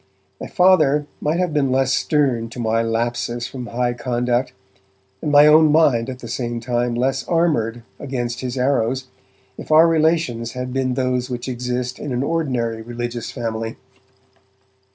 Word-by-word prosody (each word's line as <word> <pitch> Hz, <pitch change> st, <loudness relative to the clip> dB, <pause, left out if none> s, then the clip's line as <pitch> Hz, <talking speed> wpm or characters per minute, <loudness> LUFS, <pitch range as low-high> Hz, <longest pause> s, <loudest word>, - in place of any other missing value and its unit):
My -, -, -6 dB
Father 155 Hz, -6 st, +3 dB, 0.2 s
might 155 Hz, +3 st, 0 dB
have 180 Hz, -3 st, 0 dB
been 140 Hz, -3 st, +1 dB
less 130 Hz, 0 st, +2 dB
stern 130 Hz, -8 st, +1 dB
to 120 Hz, -, -9 dB
my 115 Hz, 0 st, +1 dB
lapses 120 Hz, +1 st, -2 dB
from 125 Hz, -2 st, -7 dB
high 120 Hz, 0 st, -1 dB
conduct, 120 Hz, +1 st, -1 dB, 0.7 s
and 150 Hz, -, -2 dB
my 145 Hz, 0 st, +7 dB
own 155 Hz, 0 st, +6 dB
mind 135 Hz, -6 st, +3 dB
at 130 Hz, -, -6 dB
the 125 Hz, -, -10 dB
same 120 Hz, 0 st, -3 dB
time 120 Hz, 0 st, -1 dB
less 135 Hz, +2 st, 0 dB
armoured 120 Hz, -10 st, 0 dB, 0.2 s
against 120 Hz, -4 st, -3 dB
his 130 Hz, 0 st, -4 dB
arrows, 130 Hz, 0 st, 0 dB, 0.5 s
if -, -, -8 dB
our 160 Hz, +2 st, +7 dB
relations 160 Hz, -8 st, +1 dB
had 125 Hz, 0 st, -5 dB
been 130 Hz, -1 st, 0 dB
those 125 Hz, -1 st, -1 dB
which 125 Hz, 0 st, -5 dB
exist 125 Hz, 0 st, -3 dB
in 145 Hz, -, -5 dB
an 125 Hz, +2 st, -1 dB
ordinary 130 Hz, -8 st, -1 dB
religious 120 Hz, 0 st, -5 dB
family. 115 Hz, -2 st, -4 dB
125 Hz, 155 wpm, -20 LUFS, 120-145 Hz, 0.7 s, my